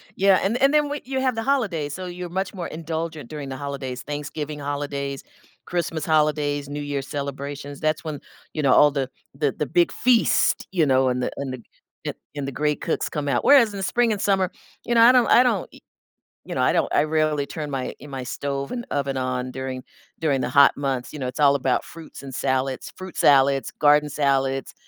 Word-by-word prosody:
Yeah. 195 -1 +4
And 220 +5 +1
and 275 +2 +5
then 295 -1 +3
when 290 0 -4
you 265 0 -2
have 255 -3 +1
the 225 - -2
holidays, 190 - 0
so 185 - -6
you're 180 0 -6
much 190 +2 -3
more 180 -3 -5
indulgent 160 -3 -5
during 145 -3 -6
the 130 - -5
holidays, 135 -3 -5
Thanksgiving 150 +1 -5
holidays, 140 -1 -4 0.4
Christmas 165 -2 -2
holidays, 150 -2 +1
New 145 +1 -4
Year 145 -1 -2
celebrations, 140 0 -6
that's 155 +2 0
when, 155 -3 -5 0.3
you 155 - -2
know, 135 -3 +4
all 150 - +6
the 135 -2 -2 0.2
the 140 0 0
the 150 - -3
big 175 +5 +2
feast, 245 -2 +2
you 170 -5 +2
know, 130 -1 +3
and 125 0 -1
the - - -1
and 135 -2 -4
the 120 - -8 0.4
the - - -3 0.2
and 140 -1 -3
the 140 - -3
great 150 +2 -1
cooks 165 - -1
come 150 -2 -3
out. 125 -3 +1
Whereas 235 -7 +6
in - - -5
the 195 - -3
spring 240 +3 +2
and 205 - -2
summer, 190 -2 +2 0.3
you 240 - 0
know, 230 - +6
I 240 +2 +9
don't 250 -2 +4
I 250 - +7
don't 225 -7 0
e - - -14 0.7
you - - -6
know, - - 0
I - - +4
don't - - +1
I - - +4
rarely 155 -2 +1
turn 150 0 -6
my 130 -2 -3
in 145 - -11
my 135 -2 -5
stove 140 +2 -4
and 240 -1 -4
oven 140 -1 -1
on 130 0 -2
during 130 -1 -5 0.4
during 145 -5 +1
the - - -1
hot 140 +1 +6
months. 135 -3 -2
You 150 - -7
know, 130 - -2
it's 125 +3 -6
all 140 -1 +6
about 130 -2 +1
fruits 165 -4 -11
and 135 -1 -8
salads, 130 0 -1
fruit 185 -1 -9
salads, 135 -2 +4
garden 150 0 +5
salads, 135 -2 0
145 Hz, 220 wpm, -23 LUFS, 135-175 Hz, 0.7 s, I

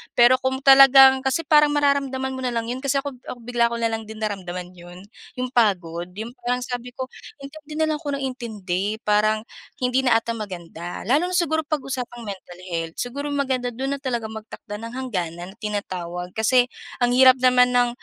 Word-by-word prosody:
pero 245 +2 +6
kung 265 0 -2
talagang 270 -1 +8
kasi 265 +5 -1
parang 300 -1 +4
mararamdaman 275 -2 +1
mo 260 - -6
na 250 -2 -2
lang 230 0 -2
'yon 250 - -4
kasi 275 0 -1
ako-ako 255 -3 -8
bigla 240 0 +1
ko 235 - -4
na 230 -1 0
lang 225 -1 -4
din 220 0 -8
naramdaman 180 -3 -4
'yon 175 0 -13 0.3
'yong 255 -1 -3
pagod 175 -8 +1
'yong 220 +3 -6 0.2
parang 250 0 0
sabi 245 0 -6
ko 260 0 -6 0.3
intindi 300 +2 -10
na 315 0 +1
lang 305 - -1
ako 290 -3 -3
ng 275 - -5
intindi 215 -6 -3
parang 215 +1 +2 0.4
hindi 250 +1 +2
na 255 -3 +3
'ata 230 +1 0
maganda 175 -6 -7
lalo 285 - +2
na 365 - -3
siguro 325 -3 +1
pag-usapang 255 -5 -4
mental 190 -4 -9
health 165 -1 -3
siguro 280 +4 -4
maganda 260 -3 -1
do'n 270 +4 -3
talagang 235 -4 -2
magtakda 215 -1 -9
ng 230 +1 -8
hangganan 180 -9 -4
na - - -20
tinatawag 180 -5 -4
kasi 245 +3 +3 0.4
ang 245 - +3
hirap 260 0 +8
naman 250 0 +4
ng 245 0 +4
245 Hz, 185 wpm, -23 LUFS, 210-265 Hz, 0.4 s, talagang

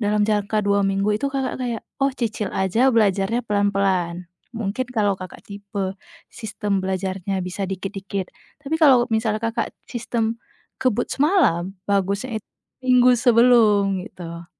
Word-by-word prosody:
dalam 210 -1 +2
jangka 210 0 0
2 200 0 +2
minggu 195 +1 +1
itu 245 +7 -1
Kakak 270 -2 -3
kayak, 235 -3 -3 0.2
"Oh 275 - +4
cicil 225 -5 -3
aja 195 +7 +2
belajarnya 215 +1 +1
pelan-pelan." 195 -4 0 0.3
Mungkin 230 +4 -2
kalau 210 -5 +1
Kakak 185 -1 -9
tipe 200 -1 -5 0.4
sistem 210 -3 -2
belajarnya 190 0 -2
bisa 185 +1 -4
dikit-dikit. 195 0 -5 0.3
Tapi 285 +1 -8
kalau 265 -6 +6
misalnya 220 -1 +1
Kakak 225 0 -2
sistem 230 -1 -2 0.4
kebut 255 -5 +1
semalam, 200 - +2
bagusnya 200 +4 0
it - - -56 0.4
minggu 250 -1 +5
sebelum, 225 -6 +4
gitu. 170 -1 -9
205 Hz, 130 wpm, -22 LUFS, 195-235 Hz, 0.4 s, kalau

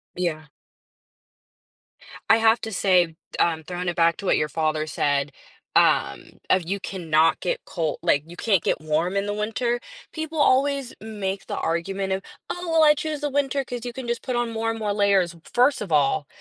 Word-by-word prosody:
Yeah. 160 -3 -2 1.8
I 225 - +7
have 225 +1 +4
to 220 - -5
say, 180 -4 +2 0.2
um, 160 -2 +1
throwing 180 0 -4
it 175 - -1
back 170 -1 +3
to 200 - -8
what - - +3
your 150 - 0
father 155 -1 -1
said, 145 -1 0 0.4
um, - - +3 0.2
of, 185 -3 +2
"You 200 +2 -2
cannot 165 -3 +1
get - - -2
col" 160 -4 -2
like, 145 - +3
"you 175 - -11
can't 195 -2 +1
get - - 0
warm 160 +5 0
in 200 - 0
the 205 - -2
winter." 225 +3 -1 0.3
People 315 0 -5
always 275 -1 +2
make 200 -3 -4
the - - -4
argument 190 +4 -2
of, 190 - -2 0.3
"Oh, 355 -1 -4
well 320 -1 +5
I 300 -1 +7
choose 305 0 -4
the 295 - -1
winter 275 0 0
'cause 245 -2 -6
you 245 - -5
can 260 -2 -7
just 235 +1 -2
put 255 - -3
on 240 -1 0
more 225 0 -1
and 225 0 -3
more 210 -2 -1
layers." 200 -4 +3
W 170 - -17
first 250 0 +3
of 195 - -5
all, 145 0 +2
200 Hz, 195 wpm, -24 LUFS, 170-240 Hz, 1.8 s, I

